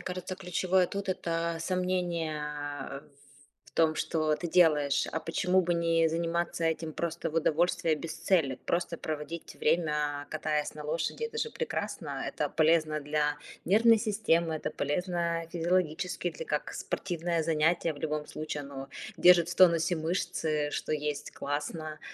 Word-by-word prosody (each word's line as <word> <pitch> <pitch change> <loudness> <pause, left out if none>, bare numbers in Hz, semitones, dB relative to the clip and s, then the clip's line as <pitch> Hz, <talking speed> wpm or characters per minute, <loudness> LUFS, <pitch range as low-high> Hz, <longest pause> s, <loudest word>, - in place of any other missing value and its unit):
кажется, 185 0 -5
ключевое 185 0 +1
тут- 200 +1 -5
это 170 -2 -1
сомнение 175 -3 -1 0.5
ф 140 +1 -6 0.6
в - - -20
том, 160 -1 +3
что 155 -1 +1
ты 170 +3 -4
делаешь. 150 -5 +4
А 160 - -1
почему 180 +3 +2
бы 175 -1 0
не 165 -1 +3
заниматься 170 +1 -1
этим 160 0 -1
просто 170 +1 -3
в - - -11
удовольствие, 165 0 +2
без 155 +1 -6
цели? 165 -6 +1
Просто 170 -1 0
проводить 155 +2 -5
время, 150 -3 0
катаясь 155 -1 -1
на 150 - -7
лошади- 160 - -2
это 460 0 -4
же 460 - -1
прекрасно. 475 - -3
Это - - -2
полезно 155 -1 +2
для 150 0 0 0.3
нервной 225 +3 +6
системы, 185 -7 +1
это - - -3
полезно 170 +2 -1
физиологически, 175 0 0
для 160 0 -7
как 150 -1 -2
спортивное 170 -2 -2
занятие. 165 +1 +2
В - - -11
любом 150 -1 -2
случае, 155 -1 -5
оно 135 -1 -8 0.3
держит 175 -2 +6
в 175 - -3
тонусе 170 -1 +5
мышцы, 155 -2 -1
что - - -2
есть 150 -1 -2
классно. 155 +2 -4
165 Hz, 145 wpm, -30 LUFS, 155-175 Hz, 0.6 s, нервной